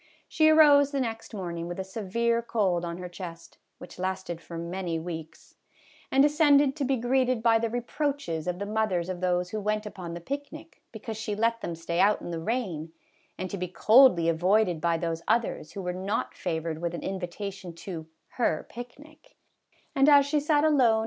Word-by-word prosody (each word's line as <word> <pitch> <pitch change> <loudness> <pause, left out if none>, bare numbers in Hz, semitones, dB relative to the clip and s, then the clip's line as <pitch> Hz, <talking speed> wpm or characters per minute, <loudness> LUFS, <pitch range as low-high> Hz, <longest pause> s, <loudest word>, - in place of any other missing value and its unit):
She 315 -1 +4
arose 290 -3 +7
the 280 -1 -2
next 225 -3 -4
morning 170 -5 -5
with 175 +2 -6
a - - -1
severe 230 +4 -1
cold 195 -7 0
on 170 0 -4
her 180 0 -6
chest 170 -2 -10 0.2
(which 180 - -12
lasted 185 -2 -3
for 170 - -8
many 170 0 -3
weeks), 160 -1 -8 0.6
and 270 +1 +5
de - - +7
scended 290 -2 +4
to 290 - -1
be 270 0 +1
greeted 250 0 +1
by 225 -1 +5
the 230 0 -1
reproaches 245 - -2
of 180 0 -1
the 200 - -4
mothers 205 -5 -1
of 180 -1 -4
those 180 0 0
who 215 - -3
went 210 +1 -1
upon 180 -5 -7
the - - -5
picnic, 290 - -7
because 220 -1 -7
she 220 -2 -3
let 230 +2 +1
them 170 - -4
stay 170 +1 -3
out 210 +1 +4
in - - -7
the 165 - -3
rain, 175 -6 -3 0.5
and 185 -1 -5
to 200 - -4
be 180 - -2
coldly 215 -1 +5
avoided 180 +1 +2
by 170 0 +2
those 165 0 -3
others 220 -8 0
who 195 - -6
were 180 0 -2
not 190 +3 -2
favored 160 -2 -3
with 170 0 -2
an - - -6
invitation 190 0 -5
to 165 -1 -8
" - - -48
her 160 -10 +1
picnic," 300 - -12 0.6
and 275 0 +4
as 285 -1 +7
she 295 +1 +1
sat 295 0 +2
alone 305 -2 +3
MRS. 225 -3 +5
200 Hz, 200 wpm, -27 LUFS, 175-245 Hz, 0.6 s, arose